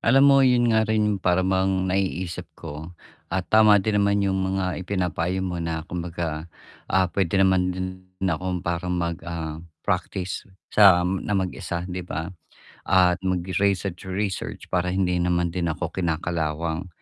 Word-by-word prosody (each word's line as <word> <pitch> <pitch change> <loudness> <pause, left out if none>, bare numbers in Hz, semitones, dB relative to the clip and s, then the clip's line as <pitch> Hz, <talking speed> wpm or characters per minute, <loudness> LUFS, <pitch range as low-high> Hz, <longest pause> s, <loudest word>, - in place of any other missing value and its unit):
alam 135 +1 +5
mo 140 -1 +7
'yun 120 -3 +4
nga 110 0 +3
rin 110 -1 +2
yung 105 -2 0
para 90 0 +2
bang 95 0 +1
naiisip 90 -2 -2
ko 80 +2 -8 0.4
at 95 0 0
tama 110 -1 +7
din 105 +2 0
naman 100 0 +2
yung 95 -1 +1
mga 95 -1 -1
ipinapayo 90 -1 -1
mo 90 -1 -3
na 80 -1 -3
kumbaga, 85 -2 -4 0.4
ah, 95 -1 +3
puwede 95 +1 0
naman 95 -1 +3
din 95 +1 -5
akong 90 +2 -2
parang 85 +1 -2
mag, 85 -1 -1
ah, 80 -2 -4 0.3
practice 95 -1 -2 0.3
sa 95 -4 +7
na 95 +3 -1
mag-isa 90 -2 -3
'di 90 0 -4
ba? 80 -1 -4 0.6
At 90 -1 +4
mag-research-research 95 +1 -2
para 90 0 +1
hindi 90 -1 +1
naman 85 -1 +1
din 85 -2 -1
ako 80 +1 -4
kinakalawang. 80 -1 -2
90 Hz, 150 wpm, -24 LUFS, 85-95 Hz, 0.6 s, mo